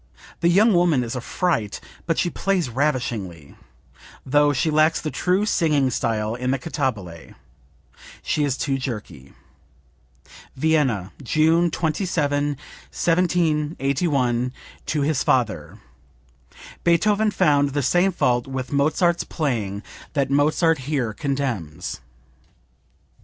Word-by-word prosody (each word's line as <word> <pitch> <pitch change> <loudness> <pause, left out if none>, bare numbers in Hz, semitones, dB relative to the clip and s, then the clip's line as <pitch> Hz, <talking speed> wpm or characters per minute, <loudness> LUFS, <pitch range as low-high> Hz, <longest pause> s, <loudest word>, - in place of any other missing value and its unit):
The 170 - +3
young 210 +5 +5
woman 170 -7 +3
is 115 +1 -5
a 125 - -3
fright, 120 - -1 0.3
but 165 - +1
she 175 - 0
plays 185 -7 0
ravishingly, 115 - -2 0.7
though 145 +2 +3
she 145 +3 0
lacks 155 +1 +3
the 155 - -4
true 185 +3 +1
singing 150 -9 +2
style 110 -2 -1
in 125 +1 -3
the 135 - +1
cantabile; 115 - -4 0.9
she 150 - 0
is 140 -2 0
too 135 -2 -1
jerky." 105 - -7 1.2
(Vienna, 135 - +1
June 160 +5 +3
27, 155 -3 0 0.4
1781, 150 -7 0 0.3
to 150 - 0
his 150 -1 +1
father. 110 - 0 1.1
Beethoven 210 +5 +3
found 145 -7 +2
the 140 +1 -2
same 175 +8 +3
fault 125 -8 +1
with 130 -1 -5
Mozart's 155 +5 +2
playing 110 - -3 0.3
that 140 -2 0
Mozart 155 +2 +2
here 130 -5 -2
condemns.) 120 - -3
145 Hz, 110 wpm, -22 LUFS, 125-165 Hz, 1.2 s, young